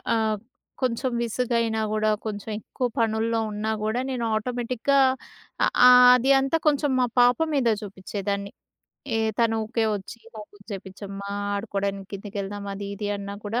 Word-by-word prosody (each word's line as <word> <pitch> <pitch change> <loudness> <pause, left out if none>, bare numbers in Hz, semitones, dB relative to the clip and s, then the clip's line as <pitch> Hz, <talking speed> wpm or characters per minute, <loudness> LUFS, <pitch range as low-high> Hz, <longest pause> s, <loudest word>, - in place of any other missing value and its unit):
ఆహ్, 220 -1 +1 0.4
కొంచెం 255 0 0
విసుగైనా 230 -1 0
గూడా 215 0 +2
కొంచెం 210 0 -5
ఎక్కువ 250 +3 -4
పనుల్లో 225 0 +1
ఉన్నా 210 +1 -2
గూడా 220 +3 0
నేను 245 -3 -2
ఆటోమేటిక్‌గా 250 +4 0 0.7
అ - - +3 0.2
ఆహ్, 250 0 +9
అది 255 +2 +2
అంతా 270 +4 +1
కొంచెం 290 -1 +2
మా 250 - +4 0.2
పాప 245 0 +5 0.2
మీద 265 -4 +2
చూపిచేదాన్ని. 200 0 -4 0.7
ఏ - - +1 0.2
తను 230 -1 +3
ఊకే 225 +1 -1
వచ్చి 200 +3 -10 0.5
చేపించమ్మా 200 0 -7 0.2
ఆడుకోవడానికి 200 -1 -3
కిందికి 200 +1 -7
వెళ్దాం 200 +1 -5
అది 200 0 -6
ఇది 205 0 -4
అన్నా 200 0 -6
కూడా 225 +4 -1
220 Hz, 140 wpm, -25 LUFS, 200-245 Hz, 0.7 s, ఆహ్